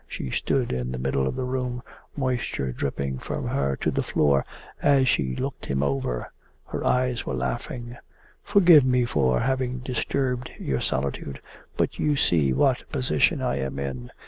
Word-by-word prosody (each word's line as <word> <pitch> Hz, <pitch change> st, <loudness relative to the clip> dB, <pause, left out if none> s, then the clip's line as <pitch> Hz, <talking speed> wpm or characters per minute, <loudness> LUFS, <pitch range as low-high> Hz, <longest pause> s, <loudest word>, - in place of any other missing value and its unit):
She 65 Hz, -, -5 dB
stood 130 Hz, -3 st, 0 dB
in 65 Hz, 0 st, -2 dB
the 65 Hz, -, -3 dB
middle 65 Hz, +1 st, 0 dB
of 65 Hz, -, -2 dB
the -, -, -2 dB
room, 125 Hz, -1 st, -2 dB, 0.3 s
moisture 125 Hz, -, -1 dB
dripping 70 Hz, 0 st, -3 dB
from -, -, -4 dB
her 70 Hz, 0 st, 0 dB
to -, -, -1 dB
the -, -, 0 dB
floor 70 Hz, -2 st, +2 dB, 0.4 s
as 140 Hz, -2 st, +4 dB
she 65 Hz, -, +1 dB
looked -, -, -4 dB
him 70 Hz, 0 st, 0 dB
over. 70 Hz, -3 st, -2 dB, 0.3 s
Her -, -, -4 dB
eyes 125 Hz, -1 st, +1 dB
were 65 Hz, -, -1 dB
laughing. 120 Hz, -, -4 dB, 0.4 s
'Forgive 180 Hz, -8 st, +7 dB
me 125 Hz, -1 st, +3 dB
for 65 Hz, -, +2 dB
having 130 Hz, -1 st, 0 dB
disturbed 125 Hz, 0 st, -2 dB
your 65 Hz, -2 st, -1 dB
solitude. 70 Hz, 0 st, -2 dB, 0.4 s
But -, -, 0 dB
you 150 Hz, -1 st, +2 dB
see 80 Hz, -, +3 dB
what 65 Hz, -, +3 dB
a -, -, -23 dB
position 65 Hz, -, +1 dB
I 65 Hz, -, 0 dB
am 65 Hz, 0 st, -3 dB
in. 65 Hz, -3 st, -4 dB
70 Hz, 170 wpm, -25 LUFS, -, 0.4 s, Forgive